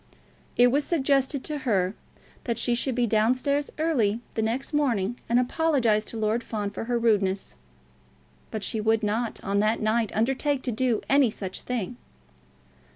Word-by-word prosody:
It 245 Hz, 0 st, +6 dB
was 285 Hz, +3 st, +2 dB
suggested 275 Hz, -3 st, +1 dB
to 300 Hz, -1 st, -3 dB
her 195 Hz, -8 st, +1 dB, 0.5 s
that 235 Hz, -2 st, -1 dB
she 240 Hz, -, +1 dB
should 250 Hz, +1 st, 0 dB
be 245 Hz, -1 st, +2 dB
down 220 Hz, +2 st, +3 dB
stairs 280 Hz, +2 st, -1 dB
early 245 Hz, -10 st, +1 dB
the 220 Hz, -, -1 dB
next 235 Hz, +7 st, -2 dB
morning, 240 Hz, -7 st, 0 dB
and 235 Hz, -, +3 dB
apologise 250 Hz, -5 st, +2 dB
to 230 Hz, -, -7 dB
Lord 220 Hz, +2 st, 0 dB
Fawn 210 Hz, -3 st, -3 dB
for 215 Hz, -, -5 dB
her 240 Hz, 0 st, 0 dB
rudeness; 200 Hz, -4 st, +1 dB, 0.9 s
but 215 Hz, -, -5 dB
she 220 Hz, -, 0 dB
would 220 Hz, +1 st, +2 dB
not, 220 Hz, +2 st, -1 dB
on 200 Hz, 0 st, 0 dB
that 215 Hz, +2 st, +2 dB
night, 220 Hz, 0 st, +1 dB
undertake 265 Hz, +5 st, 0 dB
to 250 Hz, -, -1 dB
do 235 Hz, 0 st, 0 dB
any 275 Hz, -3 st, +4 dB
such 190 Hz, -3 st, -5 dB
thing. 245 Hz, -1 st, -4 dB
235 Hz, 165 wpm, -26 LUFS, 215-265 Hz, 0.9 s, It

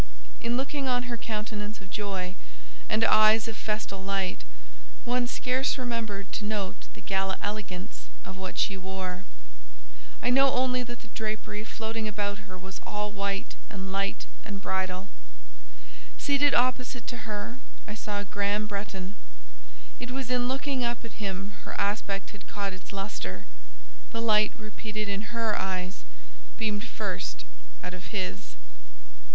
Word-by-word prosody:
In 235 Hz, +1 st, +2 dB
looking 275 Hz, +1 st, 0 dB
on 245 Hz, -1 st, +3 dB
her 245 Hz, -1 st, -1 dB
countenance 215 Hz, -1 st, -2 dB
of 195 Hz, -1 st, -12 dB
joy, 195 Hz, -3 st, -1 dB, 0.6 s
and 220 Hz, -, +4 dB
eyes 215 Hz, 0 st, +8 dB
of 225 Hz, -, -2 dB
festal 210 Hz, -3 st, -1 dB
light, 195 Hz, -, 0 dB, 0.6 s
one 245 Hz, 0 st, +3 dB
scarce 255 Hz, +3 st, +2 dB
remembered 230 Hz, -6 st, -1 dB
to -, -, -1 dB
note 210 Hz, -3 st, -1 dB
the -, -, -9 dB
gala 190 Hz, 0 st, +1 dB
elegance 205 Hz, -3 st, -3 dB, 0.2 s
of 190 Hz, -, -6 dB
what 190 Hz, -1 st, -4 dB
she 195 Hz, -, +3 dB
wore; 190 Hz, 0 st, -3 dB, 1.0 s
I 245 Hz, -, +5 dB
know 270 Hz, +1 st, +7 dB
only 255 Hz, 0 st, +4 dB
that 240 Hz, -1 st, -5 dB
the -, -, -11 dB
drapery 215 Hz, -1 st, -2 dB
floating 220 Hz, 0 st, -2 dB
about 205 Hz, 0 st, -1 dB
her 185 Hz, -, -6 dB
was 190 Hz, +1 st, -7 dB
all 210 Hz, 0 st, -1 dB
white 200 Hz, -1 st, 0 dB, 0.2 s
and 190 Hz, -3 st, -4 dB
light 195 Hz, 0 st, +1 dB, 0.2 s
and 200 Hz, -2 st, -4 dB
bridal; 190 Hz, 0 st, 0 dB, 1.1 s
seated 285 Hz, 0 st, +5 dB
opposite 250 Hz, -1 st, +3 dB
to 240 Hz, -2 st, -4 dB
her 210 Hz, +4 st, -2 dB, 0.3 s
I 210 Hz, -, -3 dB
saw 210 Hz, -1 st, -1 dB
Graham 205 Hz, +1 st, +2 dB
Bretton; 200 Hz, -2 st, -3 dB, 0.9 s
it 250 Hz, -, -3 dB
was 255 Hz, -1 st, -1 dB
in 245 Hz, -1 st, +4 dB
looking 270 Hz, 0 st, +1 dB
up 240 Hz, 0 st, 0 dB
at 225 Hz, -, -8 dB
him 195 Hz, 0 st, -1 dB
her -, -, -4 dB
aspect 200 Hz, -1 st, +1 dB
had 210 Hz, -, -11 dB
caught 200 Hz, -2 st, -1 dB
its 185 Hz, -, -8 dB
lustre—the -, -, -6 dB
light 215 Hz, -2 st, +6 dB
repeated 215 Hz, -1 st, -3 dB
in 200 Hz, +1 st, -1 dB
her 230 Hz, -2 st, +2 dB
eyes 185 Hz, 0 st, -1 dB, 0.5 s
beamed 215 Hz, -1 st, +1 dB
first 65 Hz, -, -2 dB, 0.4 s
out 180 Hz, -, -3 dB
of 180 Hz, -1 st, -7 dB
his. 140 Hz, -, -2 dB
210 Hz, 145 wpm, -30 LUFS, 195-230 Hz, 1.1 s, eyes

